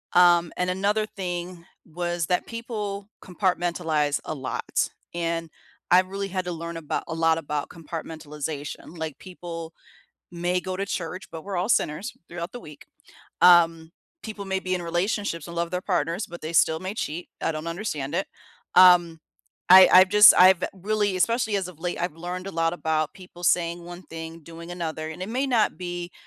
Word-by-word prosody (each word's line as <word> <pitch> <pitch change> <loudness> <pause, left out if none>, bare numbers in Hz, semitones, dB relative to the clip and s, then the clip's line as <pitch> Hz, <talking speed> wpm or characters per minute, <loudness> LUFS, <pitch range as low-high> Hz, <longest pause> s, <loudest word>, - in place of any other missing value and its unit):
Um, 175 -1 +5
and 180 0 0
another 200 +4 +1
thing 180 -3 -6 0.2
was 175 0 -3
that 180 - 0
people 210 -4 -5
compartmentalize 170 -5 0
a 155 - -4
lot, 130 -2 -2 0.2
and 165 -1 -2 0.4
I've 185 +1 +5
really 195 +1 -4
had 185 -1 -3
to 180 - -3
learn 170 0 -5
about 160 -3 -3
a - - -4
lot 165 0 +3
about 150 -2 -3
compartmentalization, 155 -1 -7
like, 160 -3 -5
people 170 -3 -8 0.6
may 175 +1 -1
go 185 0 -5
to 195 - -2
church, 180 -1 -4
but 165 -1 -8
we're 195 -2 -4
all 180 +5 -1
sinners 155 -4 0
throughout 170 +1 -6
the 245 - -8
week, 150 -9 -13 0.6
um, 165 -2 +5 0.3
people 215 -2 -6
may 190 0 -1
be 185 -1 -2
in 180 - -3
relationships 175 0 -2
and 170 - -8
love 170 0 -2
their 180 0 -2
partners, 175 0 -1
but 175 0 -10
they 155 +2 -5
still 160 0 +4
may 185 +2 -4
cheat, 175 -5 -4
I - - 0
don't 155 +1 -5
understand 165 -6 -4
it, 190 - -1 0.5
um, 175 -3 +7 0.5
I 185 0 +11
I've 185 +1 +8
just, 210 +1 +9
I've 185 0 +7
really, 205 +1 -1
especially 220 +3 +1
as 190 -2 -1
of 175 -4 -12
late 175 +1 -3
I've 175 -3 -2
learned 180 +3 -5
a - - -5
lot 165 0 0
about 155 -2 -1
people 180 -2 -14
saying 170 0 +1
one 175 +1 -9
thing, 165 0 -8
doing 170 +2 -10
another, 160 -3 -4
and 160 +3 -8
it 190 - -6
may 255 +4 0
not 235 -5 +2
be, 175 -1 -5
175 Hz, 180 wpm, -25 LUFS, 165-185 Hz, 0.6 s, I